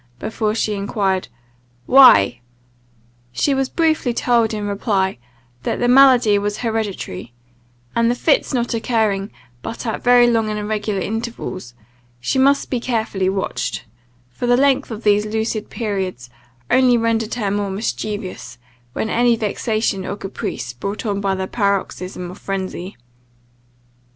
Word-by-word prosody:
before 215 Hz, -, -2 dB
she 215 Hz, -2 st, 0 dB
enquired 200 Hz, -2 st, -1 dB, 0.6 s
"Why?" 120 Hz, -, +7 dB, 0.9 s
She 275 Hz, -, +1 dB
was 270 Hz, -1 st, 0 dB
briefly 315 Hz, -7 st, +1 dB
told, 235 Hz, -3 st, +2 dB
in 210 Hz, -2 st, -3 dB
reply, 200 Hz, -, -1 dB, 0.4 s
that -, -, -2 dB
the 245 Hz, -, +1 dB
malady 245 Hz, -5 st, +6 dB
was 205 Hz, +1 st, -2 dB
hereditary, 205 Hz, -, -4 dB, 0.6 s
and 230 Hz, 0 st, +3 dB
the 240 Hz, -, +1 dB
fits 290 Hz, +4 st, +2 dB
not 240 Hz, -2 st, -1 dB
occurring 220 Hz, -4 st, 0 dB, 0.3 s
but 230 Hz, +2 st, -6 dB
at 225 Hz, -, -3 dB
very 245 Hz, 0 st, +6 dB
long 225 Hz, -2 st, +2 dB
and 210 Hz, -, -2 dB
irregular 210 Hz, -1 st, -2 dB
intervals, 210 Hz, -, -5 dB, 0.4 s
she 120 Hz, -, -1 dB
must 280 Hz, +2 st, +3 dB
be 250 Hz, -, 0 dB
carefully 220 Hz, -6 st, -1 dB
watched; 190 Hz, -8 st, -3 dB, 0.5 s
for 185 Hz, -, -4 dB
the 245 Hz, 0 st, +4 dB
length 275 Hz, +1 st, +2 dB
of 225 Hz, -1 st, -7 dB
these 210 Hz, 0 st, +3 dB
lucid 220 Hz, 0 st, -2 dB
periods 190 Hz, -, -4 dB, 0.4 s
only 255 Hz, -2 st, +5 dB
rendered 225 Hz, -1 st, 0 dB
her 210 Hz, -5 st, -1 dB
more 205 Hz, 0 st, -1 dB
mischievous, 195 Hz, -, -4 dB, 0.4 s
when 220 Hz, -, -2 dB
any 240 Hz, +1 st, +3 dB
vexation 215 Hz, -2 st, -1 dB
or 200 Hz, -, -4 dB
caprice 125 Hz, -, -5 dB
brought 200 Hz, -, -5 dB
on 200 Hz, -2 st, -1 dB
the 190 Hz, -1 st, -1 dB
paroxysm 190 Hz, -3 st, -2 dB
of 185 Hz, -, -12 dB
phrensy. 190 Hz, -1 st, -5 dB
215 Hz, 135 wpm, -20 LUFS, 195-235 Hz, 0.9 s, Why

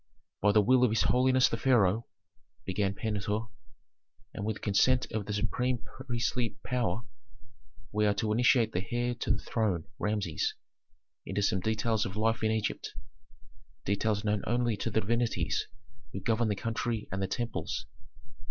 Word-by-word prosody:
"By 105 Hz, -, +5 dB
the 105 Hz, 0 st, +5 dB
will 125 Hz, +4 st, +5 dB
of 125 Hz, -, +5 dB
his 110 Hz, -, +2 dB
holiness 130 Hz, 0 st, +4 dB
the 115 Hz, -, -2 dB
pharaoh," 115 Hz, -3 st, +3 dB, 0.6 s
began 95 Hz, +1 st, 0 dB
Pentuer, 105 Hz, +1 st, -2 dB, 0.8 s
"and 105 Hz, -, -5 dB
with 110 Hz, 0 st, -3 dB
consent 120 Hz, +5 st, +3 dB
of 110 Hz, -2 st, -3 dB
the 105 Hz, -, -2 dB
supreme 125 Hz, +4 st, 0 dB
priestly 120 Hz, -1 st, -3 dB
power, 120 Hz, -4 st, -1 dB, 0.9 s
we 105 Hz, 0 st, +2 dB
are 105 Hz, -, +3 dB
to 110 Hz, +1 st, 0 dB
initiate 120 Hz, -1 st, +4 dB
the 90 Hz, -1 st, -2 dB
heir 120 Hz, 0 st, 0 dB
to 120 Hz, -, -5 dB
the -, -, +3 dB
throne, 100 Hz, -8 st, 0 dB, 0.2 s
Rameses, 105 Hz, -6 st, -1 dB, 0.7 s
into 100 Hz, +1 st, -2 dB
some 95 Hz, -1 st, +2 dB
details 110 Hz, +2 st, 0 dB
of 95 Hz, -, -7 dB
life 115 Hz, +1 st, +1 dB
in 110 Hz, -, +3 dB
Egypt, 110 Hz, -2 st, -2 dB, 0.9 s
details 100 Hz, +1 st, 0 dB
known 105 Hz, -1 st, +1 dB
only 120 Hz, 0 st, +1 dB
to 105 Hz, -, -3 dB
the 110 Hz, 0 st, +1 dB
divinities 115 Hz, -5 st, 0 dB, 0.5 s
who -, -, -3 dB
govern 110 Hz, +4 st, +1 dB
the 105 Hz, -, 0 dB
country 115 Hz, +1 st, -2 dB
and 95 Hz, +1 st, -2 dB
the 95 Hz, -, 0 dB
temples. 120 Hz, -, -3 dB
110 Hz, 155 wpm, -30 LUFS, 100-120 Hz, 0.9 s, By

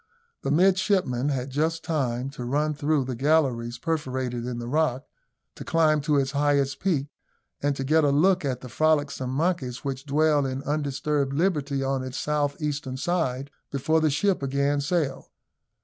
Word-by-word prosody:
The -, -, -2 dB
midshipmen 180 Hz, -, +2 dB
had 135 Hz, -1 st, -2 dB
just 160 Hz, +4 st, 0 dB
time 130 Hz, -4 st, -1 dB
to 130 Hz, -3 st, -7 dB
run 150 Hz, +5 st, 0 dB
through 145 Hz, -1 st, 0 dB
the 130 Hz, -, -3 dB
galleries 125 Hz, -3 st, +1 dB
perforated 130 Hz, -5 st, -2 dB
in 125 Hz, -1 st, -3 dB
the 120 Hz, -, -5 dB
rock, 140 Hz, -1 st, 0 dB, 0.5 s
to -, -, -9 dB
climb 155 Hz, -2 st, +3 dB
to 150 Hz, 0 st, +1 dB
its 135 Hz, -1 st, +1 dB
highest 140 Hz, -1 st, +1 dB
peak, 150 Hz, -7 st, 0 dB, 0.5 s
and 145 Hz, 0 st, +1 dB
to 135 Hz, -, -3 dB
get 155 Hz, +4 st, +3 dB
a 145 Hz, -, +4 dB
look 180 Hz, +6 st, +3 dB
at 130 Hz, -3 st, -2 dB
the 130 Hz, -, -8 dB
frolicsome 145 Hz, -1 st, +1 dB
monkeys 135 Hz, -3 st, -1 dB
which 135 Hz, +1 st, -4 dB
dwell 150 Hz, 0 st, +3 dB
in 130 Hz, +1 st, -4 dB
undisturbed 145 Hz, -1 st, -1 dB
liberty 145 Hz, -4 st, 0 dB
on 135 Hz, -1 st, -1 dB
its 130 Hz, 0 st, -5 dB
south 145 Hz, -1 st, -1 dB
eastern 145 Hz, -4 st, -3 dB
side, 140 Hz, -4 st, -1 dB, 0.2 s
before 155 Hz, +4 st, +1 dB
the 155 Hz, -, +3 dB
ship 180 Hz, +6 st, +1 dB
again 140 Hz, +1 st, 0 dB
sailed. 145 Hz, -3 st, -1 dB
145 Hz, 165 wpm, -26 LUFS, 130-155 Hz, 0.5 s, a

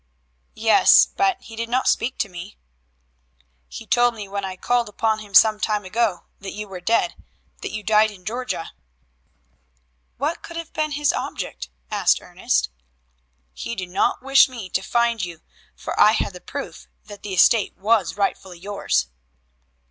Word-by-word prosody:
"Yes, 220 Hz, 0 st, +6 dB
but 390 Hz, -2 st, +2 dB
he 225 Hz, -, -11 dB
did 230 Hz, +1 st, -4 dB
not 255 Hz, +2 st, +1 dB
speak 245 Hz, +3 st, +1 dB
to 215 Hz, -, -1 dB
me." 180 Hz, +2 st, -10 dB, 1.1 s
"He 60 Hz, 0 st, -9 dB
told 240 Hz, -1 st, +3 dB
me 210 Hz, -2 st, -7 dB
when 200 Hz, 0 st, -4 dB
I 190 Hz, -1 st, -4 dB
called 240 Hz, +3 st, 0 dB
upon 220 Hz, +1 st, 0 dB
him 205 Hz, -2 st, -10 dB
some 215 Hz, +2 st, +7 dB
time 210 Hz, -2 st, -1 dB
ago 215 Hz, -1 st, -1 dB
that 195 Hz, -1 st, -7 dB
you 210 Hz, 0 st, -6 dB
were 185 Hz, -2 st, -8 dB
dead 225 Hz, +6 st, +1 dB, 0.5 s
that -, -, -4 dB
you 215 Hz, 0 st, -6 dB
died 215 Hz, +1 st, +4 dB
in 190 Hz, -3 st, -14 dB
Georgia." 240 Hz, -4 st, -4 dB, 1.5 s
"What 295 Hz, +6 st, -2 dB
could 340 Hz, -, -9 dB
have 335 Hz, -1 st, -7 dB
been 305 Hz, -1 st, -1 dB
his 290 Hz, -1 st, +1 dB
object?" 65 Hz, -, -5 dB, 1.8 s
"He 235 Hz, -, -5 dB
did 185 Hz, -3 st, -5 dB
not 195 Hz, +6 st, 0 dB
wish 270 Hz, 0 st, +6 dB
me 230 Hz, -8 st, -8 dB
to 190 Hz, -, 0 dB
find 235 Hz, 0 st, +1 dB
you, 170 Hz, -2 st, -6 dB, 0.3 s
for -, -, -5 dB
I -, -, +7 dB
had -, -, -1 dB
the -, -, -11 dB
proof -, -, -7 dB, 0.2 s
that 205 Hz, -1 st, -11 dB
the 195 Hz, -2 st, -5 dB
estate 210 Hz, +3 st, +4 dB
was 205 Hz, -3 st, +1 dB
rightfully 190 Hz, -3 st, -2 dB
yours." 180 Hz, -, -1 dB
215 Hz, 160 wpm, -22 LUFS, 190-235 Hz, 1.8 s, some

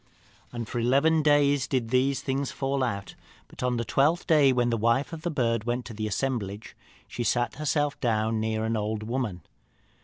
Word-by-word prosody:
"And 120 Hz, -2 st, -5 dB
for 120 Hz, -, -3 dB
eleven 140 Hz, +7 st, +3 dB
days 145 Hz, -2 st, +3 dB
did 125 Hz, -4 st, -1 dB
these 130 Hz, +2 st, +1 dB
things 135 Hz, 0 st, -1 dB
so -, -, -10 dB
fall 135 Hz, 0 st, -1 dB
out. 100 Hz, -5 st, -3 dB, 0.3 s
But -, -, -12 dB
on 125 Hz, -1 st, 0 dB
the 115 Hz, -, -2 dB
twelfth 150 Hz, +9 st, +2 dB
day, 150 Hz, -5 st, +5 dB
when 120 Hz, -1 st, +1 dB
the -, -, +2 dB
wife 115 Hz, +8 st, +1 dB
of 160 Hz, -, -6 dB
the 175 Hz, -, -2 dB
bird 115 Hz, -7 st, 0 dB
went 120 Hz, +1 st, -2 dB
to 115 Hz, -, -8 dB
the 110 Hz, 0 st, -3 dB
assemblage, 105 Hz, -3 st, -3 dB, 0.3 s
she 120 Hz, -, -4 dB
sat 120 Hz, +3 st, 0 dB
herself 145 Hz, -1 st, 0 dB
down 110 Hz, -2 st, 0 dB
near 110 Hz, 0 st, -1 dB
an 115 Hz, +1 st, 0 dB
old 110 Hz, 0 st, -2 dB
woman. 115 Hz, -6 st, -3 dB
125 Hz, 195 wpm, -27 LUFS, 110-140 Hz, 0.3 s, day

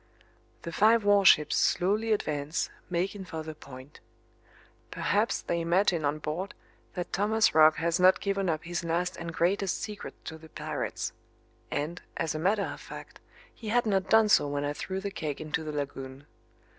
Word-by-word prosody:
The 170 Hz, -, -5 dB
five 220 Hz, +6 st, +4 dB
warships 200 Hz, -7 st, +5 dB
slowly 205 Hz, +5 st, +2 dB
advance, 150 Hz, -7 st, -1 dB, 0.2 s
making 190 Hz, +3 st, -2 dB
for 160 Hz, -4 st, -6 dB
the 155 Hz, 0 st, -6 dB
point. 135 Hz, -1 st, -13 dB, 0.9 s
Perhaps 220 Hz, +5 st, 0 dB
they 170 Hz, 0 st, -1 dB
imagine 170 Hz, -1 st, +2 dB
on 145 Hz, +1 st, 0 dB
board 160 Hz, +6 st, -4 dB, 0.4 s
that 180 Hz, -3 st, -5 dB
Thomas 215 Hz, +4 st, +2 dB
Roch 155 Hz, 0 st, +7 dB
has 170 Hz, +2 st, 0 dB
not 185 Hz, 0 st, +6 dB
given 195 Hz, -2 st, -1 dB
up 155 Hz, -1 st, -1 dB
his 170 Hz, 0 st, -3 dB
last 175 Hz, +2 st, -1 dB
and 170 Hz, 0 st, -6 dB
greatest 185 Hz, +3 st, 0 dB
secret 210 Hz, -1 st, -6 dB
to 160 Hz, 0 st, -7 dB
the 160 Hz, 0 st, -14 dB
pirates -, -, -4 dB, 0.6 s
and, 160 Hz, +5 st, -3 dB, 0.2 s
as 160 Hz, -1 st, -1 dB
a 155 Hz, -, -3 dB
matter 200 Hz, +5 st, +2 dB
of -, -, -6 dB
fact, -, -, -10 dB, 0.3 s
he 225 Hz, -, -10 dB
had 240 Hz, +2 st, +2 dB
not 195 Hz, -3 st, 0 dB
done 220 Hz, -1 st, +6 dB
so 210 Hz, -, +4 dB
when 145 Hz, 0 st, -2 dB
I 145 Hz, -, -1 dB
threw 190 Hz, +5 st, -4 dB
the 200 Hz, 0 st, -4 dB
keg 150 Hz, -6 st, -4 dB
into 155 Hz, +1 st, -3 dB
the 155 Hz, -, -4 dB
lagoon. 135 Hz, -1 st, -5 dB
170 Hz, 170 wpm, -29 LUFS, 155-200 Hz, 0.9 s, Roch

